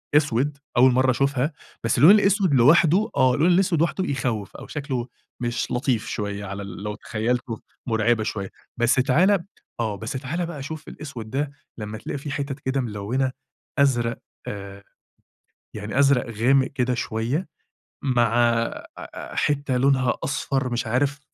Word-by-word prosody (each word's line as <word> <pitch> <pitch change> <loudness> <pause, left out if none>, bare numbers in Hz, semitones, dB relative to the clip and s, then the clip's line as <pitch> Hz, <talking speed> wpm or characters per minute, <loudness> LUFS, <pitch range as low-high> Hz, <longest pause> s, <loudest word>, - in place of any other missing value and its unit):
أسوِد، 145 -1 +2 0.2
أول 130 +2 +7
مرّة 130 +1 +4
أشوفها، 140 +3 0 0.3
بس 115 - +1
اللون 150 +9 +9
الأسوِد 200 -5 +4
لوحده 160 - +5
آه 130 -1 +4
اللون 160 +5 +3
الأسوِد 180 -3 +3
لوحده 170 +3 +1
يخوِّف 125 - -2
أو - - -10
شكله 135 -4 -3 0.3
مش 120 0 -2
لطيف 125 -3 0
شوية 100 -2 -3
على 95 +1 -5
ال 100 0 -8
لو 105 0 -3
تخيّلته 115 +2 -2 0.3
مرعِبة 110 0 +2
شوية، 100 -2 -4 0.3
بس 120 0 +3
تعالَ 170 +9 +3 0.3
آه، 110 -3 -1
بس 110 +3 -5
تعالَ 145 +6 -3
بقى 150 -5 -6
شوف 155 +2 -7
الأسوِد 120 -7 -8
ده 140 +2 -1 0.3
لما 105 -1 -5
تلاقي 125 - -5
فيه 145 +1 -6
حِتَت 140 0 -3
كده 135 0 -1
ملوّنة 120 +4 -1 0.5
أزرق 120 -4 +2 0.3
آآ، 100 -1 -7 0.9
يعني 105 +5 -3
أزرق 140 -3 +4
غامق 130 +5 +3
كده 125 -2 0
شوية 120 - -2 0.6
مع 120 -4 +2
أ 115 -1 +1
أ - - -8
حِتّة 140 -3 +1
لونها 130 -1 +3
أصفر، 135 -2 -1
مش 120 -1 -2
عارف 140 +5 +1
130 Hz, 150 wpm, -24 LUFS, 115-145 Hz, 0.9 s, اللون